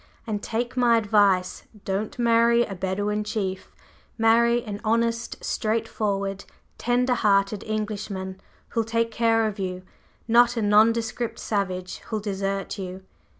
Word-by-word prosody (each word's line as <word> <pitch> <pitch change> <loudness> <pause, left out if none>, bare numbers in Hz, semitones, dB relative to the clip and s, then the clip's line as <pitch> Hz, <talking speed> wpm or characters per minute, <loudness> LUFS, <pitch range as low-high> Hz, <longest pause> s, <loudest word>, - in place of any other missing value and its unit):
And 210 -3 -3
take 240 +4 -3
my 240 -2 +4
advice: 205 -4 +2 0.2
don't 200 +4 -2
marry 235 0 +4
a 195 - -6
Bedouin 205 +3 -1
chief; 200 -3 -4 0.5
marry 235 +1 +4
an 205 -2 -6
honest, 230 +1 0
straightforward, 200 -3 -1 0.4
tender 250 +1 +2
hearted 200 -2 +2
Englishman 205 -3 -4 0.3
who'll 230 - 0
take 230 +1 0
care 225 0 +2
of 210 -2 -3
you, 185 -1 -4 0.4
not 240 +1 +5
a - - +1
nondescript 225 +2 +2
savage 185 -3 -2
who'll 220 - -2
desert 195 0 -3
you!" 185 0 -6
215 Hz, 125 wpm, -25 LUFS, 195-230 Hz, 0.5 s, not